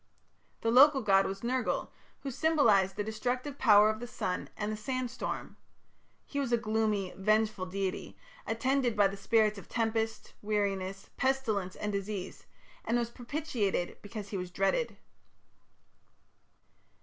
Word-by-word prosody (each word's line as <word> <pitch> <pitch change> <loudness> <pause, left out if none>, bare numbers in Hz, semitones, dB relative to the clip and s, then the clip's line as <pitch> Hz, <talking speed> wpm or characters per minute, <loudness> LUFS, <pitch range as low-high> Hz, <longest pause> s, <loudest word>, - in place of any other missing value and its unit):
The 225 - +1
local 270 +2 +7
god 195 -1 +4
was 195 +2 -5
Nergal, 250 +1 -1 0.3
who 275 - -4
symbolized 230 - +3
the 205 - -1
destructive 250 +6 -3
power 210 -4 +7
of 215 - -6
the 245 - -6
sun 180 -6 -3
and 210 0 -2
the - - -2
sand 250 +3 -3
storm; 255 - -5 0.7
he 285 - -4
was 270 -3 -1
a 235 - +4
gloomy, 215 -3 0
vengeful 215 -1 +1
deity, 190 0 -3 0.3
attended 250 0 +1
by 205 -1 +6
the 195 - -6
spirits 215 +1 +2
of - - -14
tempest, 225 -1 -1
weariness, 195 -2 -2
pestilence, 230 -9 0
and 210 - -3
disease, 200 -1 -5 0.4
and 235 - +1
was 235 -1 -1
propitiated 240 - -2
because 205 -1 -7
he 200 - -3
was 180 -1 -4
dreaded. 195 - 0
215 Hz, 140 wpm, -31 LUFS, 200-245 Hz, 0.7 s, local